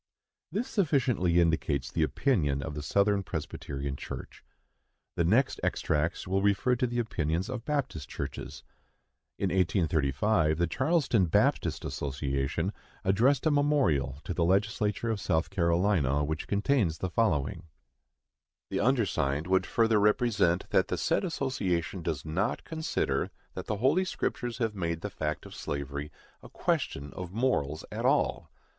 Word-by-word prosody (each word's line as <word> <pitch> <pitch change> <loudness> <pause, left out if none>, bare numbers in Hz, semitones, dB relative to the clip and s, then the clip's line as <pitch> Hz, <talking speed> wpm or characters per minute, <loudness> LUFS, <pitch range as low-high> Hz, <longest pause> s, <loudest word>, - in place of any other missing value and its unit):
This 230 +6 -1
sufficiently 125 - +2
indicates 75 -5 +1
the 80 - -1
opinion 75 - +1
of 80 - -5
the 75 - -4
Southern 100 +7 +2
Presbyterian 70 -5 -4
Church. - - -8 0.7
The 85 - +1
next 115 +11 +2
extracts 80 +2 0
will 95 +1 +1
refer 100 +6 +2
to 125 0 +1
the 120 0 -3
opinions 85 -6 -1
of 125 -2 -5
Baptist 140 - -2
Churches. - - -6 0.7
In 100 - 0
1835 80 -1 +2
the 85 - +2
Charleston 130 - +2
Baptist - - +1
Association 70 +6 -2 0.3
addressed 120 +10 +3
a 155 - +4
memorial 140 - +2
to - - -3
the 85 - +1
Legislature 105 +4 +1
of 105 -3 -2
South 80 -1 0
Carolina, 85 -6 +2
which 80 +1 -3
contains 100 - +1
the 95 - -3
following: 85 -8 0 1.0
The - - 0
undersigned 100 - +1
would 95 +1 +2
further 115 -2 +3
represent 105 -5 +2
that - - +3
the - - -2
said - - +1
association 100 - -1
does 80 -4 -3
not 95 +9 -1
consider 160 0 -1 0.2
that - - -6
the 105 - -1
Holy 145 - +3
Scriptures 120 -8 -3
have 115 -3 0
made 85 -4 -2
the 105 - -4
fact 75 -3 -3
of - - -10
slavery 70 +1 -4 0.3
a - - -12
question 70 0 -2
of 90 -1 -6
morals 95 - 0
at - - -4
all. - - +1
95 Hz, 140 wpm, -29 LUFS, 80-115 Hz, 1.0 s, a